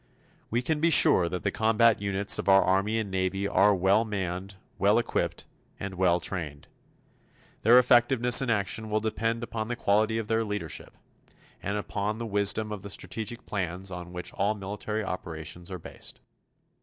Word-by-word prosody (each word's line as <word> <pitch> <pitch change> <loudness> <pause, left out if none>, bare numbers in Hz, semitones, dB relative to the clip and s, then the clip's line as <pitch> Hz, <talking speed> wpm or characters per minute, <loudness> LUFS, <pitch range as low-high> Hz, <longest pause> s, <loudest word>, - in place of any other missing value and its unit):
We 120 +2 -1
can 155 +3 -1
be 165 +2 +3
sure 90 - +6
that 90 +1 -5
the - - 0
combat 110 0 +3
units 100 0 +1
of - - -1
our 95 0 +6
Army 100 +4 +1
and 110 -3 -3
Navy 95 +1 -1
are 100 0 +4
well 95 +4 +3
manned, 95 -2 -4 0.2
well 100 +3 +4
equipped, 120 - -2 0.3
and 100 -1 -5
well 90 -1 +2
trained. 80 -6 -5 0.9
Their 120 +3 +6
effectiveness 125 0 +5
in 130 - -2
action 110 0 -1
will 105 0 +1
depend 115 +2 -2
upon 110 -2 -4
the 120 - -3
quality 110 0 +1
of 115 -2 -3
their 115 +1 +1
leadership, 105 -7 -5 0.6
and 100 +2 -2
upon 105 0 -3
the 115 - -5
wisdom 105 +1 0
of 105 -2 -5
the 100 - -8
strategic 105 +5 -5
plans 95 -1 -3
on 90 -1 -7
which 90 0 -6
all 100 +2 0
military 105 +2 -4
operations 85 -2 -6
are 95 - -5
based. 80 - -10
100 Hz, 170 wpm, -27 LUFS, 95-110 Hz, 0.9 s, sure